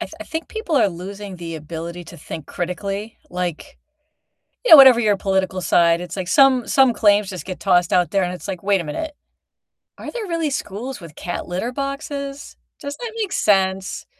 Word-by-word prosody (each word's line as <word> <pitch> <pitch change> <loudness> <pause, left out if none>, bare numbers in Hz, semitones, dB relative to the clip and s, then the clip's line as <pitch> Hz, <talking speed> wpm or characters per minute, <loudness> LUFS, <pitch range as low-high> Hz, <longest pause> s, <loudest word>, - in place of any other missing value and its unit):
I 335 - -2
th - - -19
I - - -6
think 320 +1 -5
people 440 -9 -2
are 225 - +4
losing 195 +2 -8
the 170 -1 -7
ability 170 +3 -7
to 175 - -12
think 155 -1 -8
critically. 195 +5 -4
Like, 180 - -5 0.9
you - - +2
know, 315 - +13
whatever 260 -3 +9
your 210 -3 +2
political 190 -1 -1
side, 170 0 +3
it's, 175 0 -7
like, 185 -1 -3
some 260 -1 +4
some 265 -3 +4
claims, 205 -2 +3
just, 180 -5 -7
get 185 -1 -6
tossed 175 -1 +2
out 180 -1 +2
there 195 -2 +2
and 180 0 -2
it's 180 - -8
like, 190 -2 -5
"Wait 200 -2 +2
a - - -6
minute, 225 - -4 0.9
are - - -7
there 465 -4 -5
really 330 -3 -1
schools 255 -1 -5
with 165 -3 -11
cat 175 - -5
litter 190 +8 -3
boxes? 275 0 -5 0.2
Does 285 0 -6
that 470 -2 -6
make 405 -4 -2
sense?" 190 -1 +1
195 Hz, 200 wpm, -21 LUFS, 180-275 Hz, 0.9 s, know